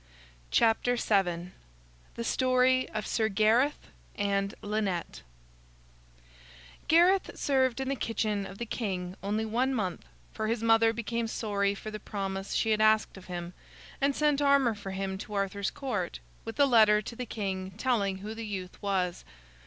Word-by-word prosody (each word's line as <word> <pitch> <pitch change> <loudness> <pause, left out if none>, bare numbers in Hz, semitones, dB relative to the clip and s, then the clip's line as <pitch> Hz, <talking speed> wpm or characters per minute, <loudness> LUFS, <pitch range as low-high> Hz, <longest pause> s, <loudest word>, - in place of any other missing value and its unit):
THE 200 -7 +2 0.7
STORY 255 +1 +2
OF 215 -1 -4
SIR 220 -1 0
GARETH 220 +8 +2
& - - -28 0.5
LYNETTE 195 - -2 1.7
Gareth 355 +4 +4
served 260 -3 +1
in 265 - -2
the 275 - 0
kitchen 215 -5 -1
of 195 - -10
the 235 - -4
king 185 -6 -3
only 210 +3 -1
one 250 +5 0
month, 190 -6 -2 0.3
for 220 -1 -2
his 230 0 -1
mother 225 0 +5
became 230 0 -2
sorry 200 -3 0
for 215 +2 -7
the 215 - -6
promise 195 -1 -4
she 225 - +1
had 215 0 +2
asked 215 0 +3
of 190 -1 -12
him, 175 -1 -6 0.5
and 280 0 +2
sent 295 -1 +2
armor 280 -4 +4
for 205 -2 -8
him 190 0 -3
to 210 +1 -7
Arthur's 200 0 -1
Court, 205 -11 -3 0.3
with 225 +4 -7
a 285 - +7
letter 215 -4 +5
to 235 - -7
the 250 0 -5
king 190 -4 -3
telling 215 -6 +1
who 210 +3 -6
the 225 0 -6
youth 185 -3 -6
was. 185 -3 -1
215 Hz, 155 wpm, -29 LUFS, 195-240 Hz, 1.7 s, a